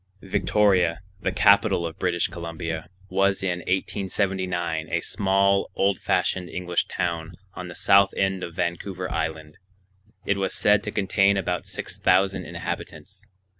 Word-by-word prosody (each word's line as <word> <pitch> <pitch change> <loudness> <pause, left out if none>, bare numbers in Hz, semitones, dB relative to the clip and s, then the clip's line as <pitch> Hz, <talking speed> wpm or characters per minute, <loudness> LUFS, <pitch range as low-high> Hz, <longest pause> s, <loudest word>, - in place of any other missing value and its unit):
Victoria, 95 -3 +2 0.2
the - - 0
capital 100 -3 +4
of 80 - -6
British 90 -2 +1
Columbia, 85 -2 -5 0.2
was 95 0 +1
in 90 -2 -1
1879 90 -2 -1
a 85 - +1
small 100 +2 +1
old 100 -1 +1
fashioned 90 -2 0
English 90 -1 -1
town 85 -1 -3 0.2
on 90 -1 -7
the 85 - -9
south 100 0 +5
end 95 -1 0
of 85 - -6
Vancouver 90 +2 -3
Island. 80 -1 -4 0.7
It 100 - +1
was 95 -1 -1
said 105 0 +4
to 105 - -3
contain 100 0 +2
about 95 - -2
six - - -6
thousand 95 +1 +2
inhabitants. 85 +3 -7
90 Hz, 135 wpm, -25 LUFS, 85-100 Hz, 0.7 s, south